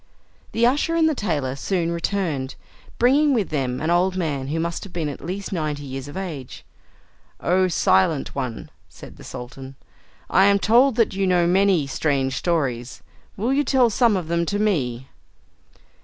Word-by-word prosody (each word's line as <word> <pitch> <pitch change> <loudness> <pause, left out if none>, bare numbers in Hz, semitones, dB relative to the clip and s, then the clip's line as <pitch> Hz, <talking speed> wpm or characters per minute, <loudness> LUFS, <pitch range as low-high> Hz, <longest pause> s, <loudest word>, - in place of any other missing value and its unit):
The 230 +1 +3
usher 290 +7 +2
and 325 -1 +4
the 315 - +2
tailor 150 - -2
soon 170 +3 -1
returned, 170 -6 -2 0.4
bringing 280 +4 +4
with 215 -5 0
them 130 -4 -2
an 160 +2 -1
old 185 +2 +2
man 145 -7 -2
who 155 +3 -2
must 170 +1 -3
have 200 - -10
been 165 -4 -2
at 140 - -8
least 190 +3 -5
ninety 150 -4 -2
years 135 0 -6
of 145 - -8
age. 155 -9 -7 0.7
"O 185 +1 +2
Silent 135 - +2
One," 125 -5 -5 0.2
said - - -13
the - - -13
Sultan, 130 +2 -9 0.5
"I 190 +2 +4
am 200 0 +5
told 240 +5 +4
that 230 -3 +2
you 195 0 0
know 180 -2 +3
many 185 -3 +3
strange 135 -1 -1
stories. 130 -7 -2 0.3
Will 230 +6 0
you 285 +1 +2
tell 255 -5 +3
some 230 -2 +3
of 175 -4 -4
them 170 0 0
to 205 - -1
me?" 135 - 0
170 Hz, 170 wpm, -22 LUFS, 140-200 Hz, 0.7 s, am